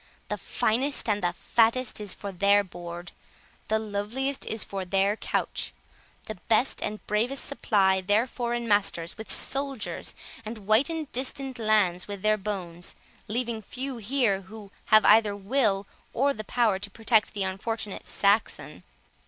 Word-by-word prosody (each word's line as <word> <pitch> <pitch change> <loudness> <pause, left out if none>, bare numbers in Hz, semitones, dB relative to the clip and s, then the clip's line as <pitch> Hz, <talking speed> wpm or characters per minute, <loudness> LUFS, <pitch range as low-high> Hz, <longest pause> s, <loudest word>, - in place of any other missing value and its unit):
The - - -1
finest 255 +3 +1
and 205 -1 +1
the 175 - +2
fattest 230 +4 +1
is 205 -2 -4
for 200 - -6
their 200 +2 +4
board; 175 -1 -8 0.6
the 220 - +2
loveliest 220 +6 -3
is 220 - -2
for 195 -1 -5
their 195 +2 +2
couch; - - -2 0.5
the 215 -4 -7
best 230 +4 +3
and 210 0 -4
bravest 235 +6 0
supply 195 -8 +2
their 205 +5 +3
foreign 240 -1 -3
masters 195 -5 +1
with 220 - -8
soldiers, 275 -3 -2 0.3
and 215 -2 -8
whiten 285 +9 +2
distant 265 0 -3
lands 210 -5 +2
with 200 -1 -7
their 215 0 +3
bones, 185 -4 -5 0.3
leaving 230 0 -2
few 255 +5 -5
here 225 -3 +1
who 200 +1 -11
have 215 0 +6
either 215 -1 +6
will 205 -1 +1 0.3
or 280 +4 +2
the 215 - -6
power 220 -5 +2
to 200 +1 -5
protect 220 0 +2
the 200 - 0
unfortunate 200 +2 -4
Saxon. 205 +2 +1
215 Hz, 145 wpm, -27 LUFS, 200-235 Hz, 0.6 s, have